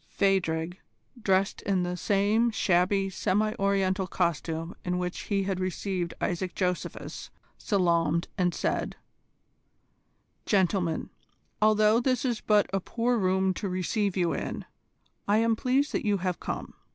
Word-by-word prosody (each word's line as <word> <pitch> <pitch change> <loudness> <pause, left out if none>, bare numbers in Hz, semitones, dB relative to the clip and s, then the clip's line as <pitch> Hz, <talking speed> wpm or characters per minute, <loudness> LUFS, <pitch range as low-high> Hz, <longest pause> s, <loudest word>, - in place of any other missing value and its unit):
Phadrig, 175 -3 0 0.4
dressed 195 -2 +1
in 190 -2 0
the 180 0 -2
same 205 +5 +2
shabby 195 -1 +2
semi 210 +3 0
Oriental 195 -1 +1
costume 165 -1 -2
in 180 0 -1
which 180 0 -3
he 200 -2 +1
had 190 -1 -2
received 185 -1 -2
Isaac 180 0 -2
Josephus, 180 -2 -3 0.3
salaamed, 170 -4 +1
and 180 -1 +1
said: - - -1 1.5
"Gentlemen, 185 -4 +1 0.5
although 215 +1 +5
this 255 +1 0
is 240 -4 -1
but 210 -1 +3
a 195 - +2
poor 235 +6 0
room 190 0 +2
to 200 +1 -4
receive 185 +2 -1
you 175 -2 +1
in, - - -4 0.6
I 205 +1 +4
am 225 0 +3
pleased 260 +5 +1
that - - -1
you 205 -2 +2
have 180 -1 -2
come. - - -5
190 Hz, 135 wpm, -28 LUFS, 180-210 Hz, 1.5 s, although